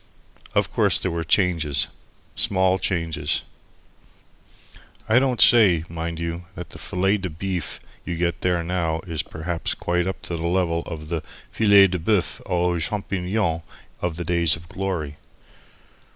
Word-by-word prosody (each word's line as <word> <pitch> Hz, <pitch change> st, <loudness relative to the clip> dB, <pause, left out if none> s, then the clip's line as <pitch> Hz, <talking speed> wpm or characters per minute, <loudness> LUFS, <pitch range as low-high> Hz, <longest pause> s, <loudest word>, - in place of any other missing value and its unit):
Of -, -, +2 dB
course -, -, +3 dB
there 95 Hz, -, -1 dB
were 85 Hz, 0 st, -2 dB
changes, 80 Hz, -5 st, +2 dB, 0.5 s
small 95 Hz, -1 st, +2 dB
changes. 85 Hz, -4 st, -1 dB, 1.6 s
I 110 Hz, +3 st, +5 dB
don't 130 Hz, -3 st, 0 dB
say, 95 Hz, -9 st, +6 dB
mind 85 Hz, 0 st, -4 dB
you, 85 Hz, +1 st, -4 dB
that -, -, -8 dB
the -, -, -10 dB
fillet 95 Hz, +3 st, +1 dB
de 95 Hz, -2 st, -4 dB
beef 90 Hz, -1 st, -4 dB
that -, -, -27 dB, 0.2 s
you 85 Hz, -, -2 dB
get 85 Hz, -1 st, -1 dB
there 90 Hz, -2 st, +1 dB
now 85 Hz, -2 st, -1 dB
is 85 Hz, -5 st, -3 dB
perhaps 80 Hz, +2 st, -3 dB
quite 90 Hz, +1 st, 0 dB
up 95 Hz, -, -3 dB
to 85 Hz, -, -4 dB
the 80 Hz, +1 st, -2 dB
level 85 Hz, -2 st, +1 dB
of 75 Hz, -2 st, -7 dB
the 85 Hz, -2 st, -1 dB, 0.3 s
filet 100 Hz, -3 st, +6 dB
de 90 Hz, -1 st, -1 dB
boeufs 90 Hz, +2 st, 0 dB
aux 90 Hz, -1 st, +1 dB
champignons 95 Hz, -1 st, -1 dB, 0.4 s
of 90 Hz, -2 st, -1 dB
the 85 Hz, -, -4 dB
days 85 Hz, -3 st, +2 dB
of 80 Hz, +1 st, -12 dB
glory. 85 Hz, -7 st, -3 dB
85 Hz, 150 wpm, -23 LUFS, 80-95 Hz, 1.6 s, say